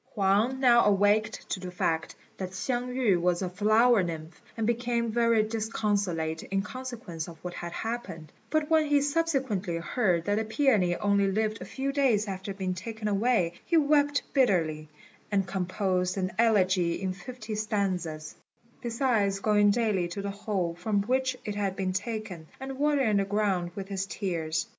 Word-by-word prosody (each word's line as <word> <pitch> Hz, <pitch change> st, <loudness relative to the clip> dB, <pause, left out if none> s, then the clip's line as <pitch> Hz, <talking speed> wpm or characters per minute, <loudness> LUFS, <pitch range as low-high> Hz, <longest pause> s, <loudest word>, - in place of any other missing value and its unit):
Huang 210 Hz, +6 st, +2 dB
now 240 Hz, -3 st, +6 dB
awaked 205 Hz, +2 st, +2 dB
to -, -, -1 dB
the 185 Hz, 0 st, -6 dB
fact 165 Hz, -2 st, -1 dB, 0.2 s
that 185 Hz, -1 st, -5 dB
Hsiang 245 Hz, +4 st, -2 dB
yü 210 Hz, -9 st, +2 dB
was 180 Hz, +1 st, +1 dB
a 185 Hz, -, -2 dB
flower 215 Hz, +4 st, +4 dB
nymph, 165 Hz, -2 st, -6 dB, 0.2 s
and 225 Hz, -, 0 dB
became 235 Hz, 0 st, 0 dB
very 230 Hz, -1 st, +3 dB
disconsolate 205 Hz, -7 st, -1 dB
in 195 Hz, 0 st, -2 dB
consequence 235 Hz, -10 st, -6 dB
of 170 Hz, -1 st, -10 dB
what 180 Hz, 0 st, -5 dB
had 175 Hz, -1 st, -6 dB
happened; 200 Hz, -9 st, -5 dB, 0.2 s
but 310 Hz, +1 st, +1 dB
when 315 Hz, -1 st, +3 dB
he 290 Hz, 0 st, +4 dB
subsequently 270 Hz, -, 0 dB
heard 170 Hz, -1 st, 0 dB
that 205 Hz, 0 st, +1 dB
the -, -, 0 dB
peony 220 Hz, -7 st, +2 dB
only 200 Hz, 0 st, +2 dB
lived 215 Hz, +2 st, -1 dB
a -, -, -5 dB
few 275 Hz, +1 st, -3 dB
days 255 Hz, -7 st, +2 dB
after 195 Hz, +1 st, -5 dB
being 190 Hz, -1 st, -3 dB
taken 215 Hz, +4 st, -5 dB
away, 205 Hz, -4 st, +2 dB
he 340 Hz, -, +2 dB
wept 290 Hz, -1 st, +3 dB
bitterly, 165 Hz, -, +1 dB, 0.4 s
and 195 Hz, -2 st, +2 dB
composed 185 Hz, 0 st, -1 dB
an 185 Hz, -1 st, -1 dB
elegy 185 Hz, -6 st, +3 dB
in 190 Hz, 0 st, -2 dB
fifty 220 Hz, +4 st, -8 dB
stanzas, 185 Hz, -8 st, -2 dB, 0.5 s
besides 230 Hz, -5 st, +1 dB
going 205 Hz, 0 st, +4 dB
daily 205 Hz, -5 st, +1 dB
to 185 Hz, +3 st, -5 dB
the 200 Hz, -, -2 dB
hole 195 Hz, -4 st, -2 dB
from 200 Hz, +3 st, -1 dB
which 260 Hz, +2 st, 0 dB
it 210 Hz, -, -2 dB
had 200 Hz, -2 st, -2 dB
been 185 Hz, -1 st, -1 dB
taken, 190 Hz, -5 st, -4 dB
and 265 Hz, 0 st, -6 dB
watering 280 Hz, -8 st, +2 dB
the 200 Hz, -, +2 dB
ground 195 Hz, -3 st, 0 dB
with 195 Hz, -1 st, -5 dB
his 195 Hz, -1 st, -2 dB
tears. 165 Hz, -6 st, -2 dB
205 Hz, 165 wpm, -28 LUFS, 185-235 Hz, 0.5 s, now